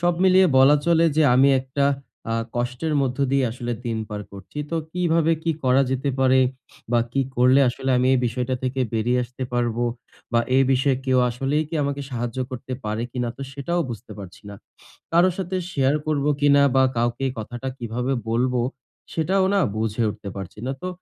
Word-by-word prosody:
সব 175 0 +2
মিলিয়ে 190 0 +6
বলা 135 +3 +7
চলে 170 -1 +4
যে 160 - +5
আমি 135 +2 +5
একটা 130 +2 -1 0.5
আ - - +1 0.2
কষ্টের 125 +6 -2
মধ্য 130 -1 -1
দিয়ে 135 -1 +3
আসলে 120 0 -4
দিন 115 -1 -1
পার 105 -1 -5
করছি। 100 +8 -10
তো 165 - -1 0.2
কিভাবে 165 -2 +2
কি 165 - 0
করা 130 +2 +4
যেতে 135 +2 -1
পারে 130 0 +4 0.5
বা 120 - +4
কি 135 - +1 0.2
করলে 125 +3 +5
আসলে 130 +2 -2
আমি 125 - +2
এই - - +3
বিষয়টা 125 +2 -2
থেকে 130 +1 -2
বেরিয়ে 120 +3 +1
আসতে 125 +2 -9
পারবো? 120 -1 0 0.5
বা 115 - +4 0.2
এই 135 - +5
বিষয়ে 135 +1 +2
কেউ 130 -1 +3
আসলেই 135 +5 0
কি 165 - -6
আমাকে 140 0 -2
সাহায্য 120 0 -4
করতে 130 0 -7
পারে 110 +1 -2
কিনা 125 -2 -2
তো 140 - -7
সেটাও 155 +6 -2
বুঝতে 115 -1 -8
পারছি 95 0 -10
না। - - -8 0.6
কারো 175 +3 +5
সাথে 185 0 -2 0.2
শেয়ার 135 -1 +2
করবো 150 -2 0
কিনা? 145 0 +5
বা 130 - +6
কাউকে 120 +3 0
কথাটা 120 +4 -5
কিভাবে 120 +3 -2 0.2
বলব 125 +3 +1 0.6
সেটাও 185 +4 +1
না 200 - +3 0.2
বুঝে 110 +1 -1
উঠতে 105 -1 -8
পারছি 95 0 -8
না। 135 - -1
তো 185 - -3
130 Hz, 185 wpm, -23 LUFS, 120-145 Hz, 0.6 s, বলা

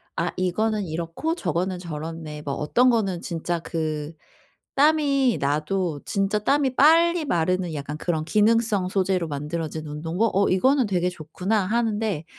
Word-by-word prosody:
'아 - - -1
이거는 210 +3 0
이렇고 170 - -3
저거는 180 - -2
저렇네.' 160 -2 -6
뭐 140 - -3
어떤 245 +12 +3
거는 195 -7 0
진짜 170 0 -3
그 155 -2 -3 0.6
땀이 280 -4 +3
나도 150 +3 -1
진짜 195 +1 0
땀이 265 +4 +1
빨리 330 +3 +5
마르는 180 - 0
약간 145 +1 -5
그런 160 -2 -1
기능성 215 -1 +2
소재로 185 -3 0
만들어진 155 +2 -4
운동복 165 +9 -1
'어 200 - +3
이거는 260 +6 +3
되게 180 -2 0
좋구나.' 180 +5 -2
하는데 215 -6 -1
185 Hz, 305 characters per minute, -24 LUFS, 160-225 Hz, 0.6 s, 빨리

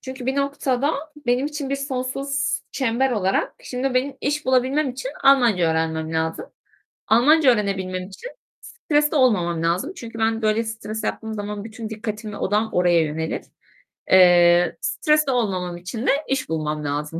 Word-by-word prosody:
çünkü 260 -1 -8
bir 265 +1 0
noktada 280 0 0 0.3
benim 245 +3 +2
için 295 -2 -5
bir 275 - 0
sonsuz 270 0 -2
çember 260 0 0
olarak 195 -4 0
Şimdi 255 +1 -3
benim 265 +2 0
iş 295 +2 -1
bulabilmem 260 +3 +2
için 260 +1 -6
Almanca 235 -11 +4
öğrenmem 160 0 -1
lazım. 160 0 -2 0.6
Almanca 275 +6 +5
öğrenebilmem 190 -4 -2
için 340 - -9 0.3
stresli 300 0 0
olmamam 180 - +2
lazım 180 - 0
çünkü 230 -1 -9
ben 225 0 0
böyle 215 +1 +1
stres 220 -1 -6
yaptığım 220 0 -3
zaman 205 -1 -5
bütün 220 0 -7
dikkatim 215 -1 -6
ve - - -7
odağım 210 +3 0
oraya 175 -1 +3
yönelir. 160 +1 -3 0.7
Eee, 175 -1 +6
stresli 305 -3 +1
olmamam 185 -8 -1
için 185 +8 -5
de - - +6 0.2
iş 265 -1 -2
bulmam 155 -1 -2
lazım. 150 +3 -3
225 Hz, 150 wpm, -22 LUFS, 180-265 Hz, 0.7 s, Eee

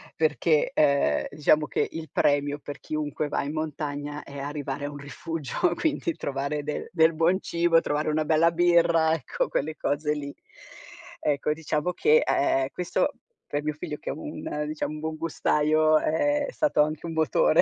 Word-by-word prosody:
Perché, 155 0 +2
ehm, 140 - +3
diciamo 150 +1 +3
che - - 0
il 160 -1 -7
premio 145 0 +1
per 145 0 -8
chiunque 150 -1 -3
va - - -1
in 145 +2 -4
montagna 145 -1 -4
è 140 - -10
arrivare 145 0 -4
a 145 - -4
un 145 - -8
rifugio, 165 - -2
quindi 320 +1 -1
trovare 140 +2 -3
del 150 +1 -4
del 165 -1 +4
buon 165 +4 +2
cibo, 170 -1 +2
trovare 150 0 -1
una 155 0 0
bella 160 +2 +4
birra, 170 -2 +4
ecco, - - -2
quelle 155 +2 -2
cose 150 +1 -1
lì. 140 -1 -5 0.9
Ecco, 145 0 0
diciamo 155 +2 -2
che 455 - +4
a - - +1 0.3
ehm, 330 - 0
questo 180 -1 -1 0.3
per 145 0 -2
mio 150 0 -1
figlio, 150 0 -6
che - - -7
è - - -3
un 150 0 -5
diciam, 155 0 -4
buongustaio, 155 0 +2
è 290 - +1
stato 305 - +2
anche 155 +2 -4
un 165 - -4
motore, 160 - +3
155 Hz, 165 wpm, -26 LUFS, 145-165 Hz, 0.9 s, del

